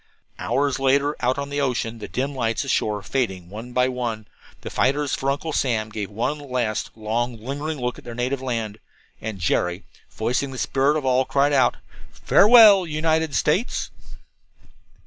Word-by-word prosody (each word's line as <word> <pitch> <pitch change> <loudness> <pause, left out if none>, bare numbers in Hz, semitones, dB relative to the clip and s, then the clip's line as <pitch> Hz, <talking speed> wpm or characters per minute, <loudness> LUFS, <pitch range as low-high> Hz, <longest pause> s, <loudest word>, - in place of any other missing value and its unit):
Hours 140 -1 0
later, 140 +2 +2
out 125 +1 +2
upon 140 0 -4
the 145 0 -1
ocean, 115 -4 -2
the - - -7
dim 135 +3 -2
lights 115 -2 -1
ashore 105 -6 -1
fading 95 -10 -2
one 115 +4 -8
by 125 +1 +2
one, 120 -4 -4 0.3
the - - -7
fighters 140 +1 +1
for 135 - -1
Uncle 145 +3 -2
Sam 115 -6 0
gave 105 -2 -5
one 125 +8 -2
last, 125 -6 -2
long, 115 +2 -2
lingering 145 +6 -4
look 125 0 -3
at - - -16
their 120 -1 -8
native 125 +2 -2
land. 115 -5 -3 0.4
And 110 -2 -5
Jerry, 90 +1 0 0.3
voicing 125 +5 -1
the 130 - -8
spirit 140 +4 +1
of 145 - -4
all, 130 0 +3
cried 140 +2 +1
out: 130 -3 +3 0.4
"Farewell, 210 -4 +6
United 160 -1 0
States." 185 +11 0
130 Hz, 165 wpm, -23 LUFS, 115-145 Hz, 0.4 s, Farewell